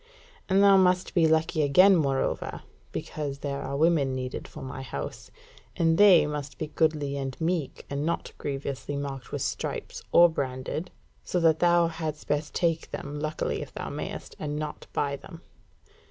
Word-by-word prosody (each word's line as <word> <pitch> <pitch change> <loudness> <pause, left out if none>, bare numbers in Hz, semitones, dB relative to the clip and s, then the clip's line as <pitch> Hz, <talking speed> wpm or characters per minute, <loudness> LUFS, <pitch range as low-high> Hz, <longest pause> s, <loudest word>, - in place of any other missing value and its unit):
And 195 +1 +5
thou 200 -1 +7
must 180 -1 +3
be 165 -2 +4
lucky 160 0 +2
again, 180 +7 +6
moreover; 140 -5 -1 0.3
because 145 -3 -4
there 140 -1 -4
are 140 +1 -3
women 150 -4 +3
needed 130 -1 -4
for - - -10
my 135 0 -6
house; 95 - -6 0.5
and 165 -1 +3
they 185 -7 +8
must 150 -1 -5
be - - -2
goodly 150 -2 0
and 135 -1 -4
meek, 165 -3 -2
and 140 +1 -3
not 170 +2 -2
grievously 140 -1 -4
marked 135 -3 -5
with - - -2
stripes, - - -4
or 175 0 +8
branded, 140 +2 -3 0.3
so 180 - -1
that 160 -1 +4
thou 175 -1 +4
hadst 160 -2 -4
best 150 +1 -1
take 165 -2 0
them, 145 +1 -5
luckily 155 +1 -2
if - - -7
thou - - -5
mayst, - - -6
and 150 -1 -3
not 150 -1 -5
buy 140 -1 -1
them. 165 +4 -12
150 Hz, 170 wpm, -27 LUFS, 140-165 Hz, 0.5 s, they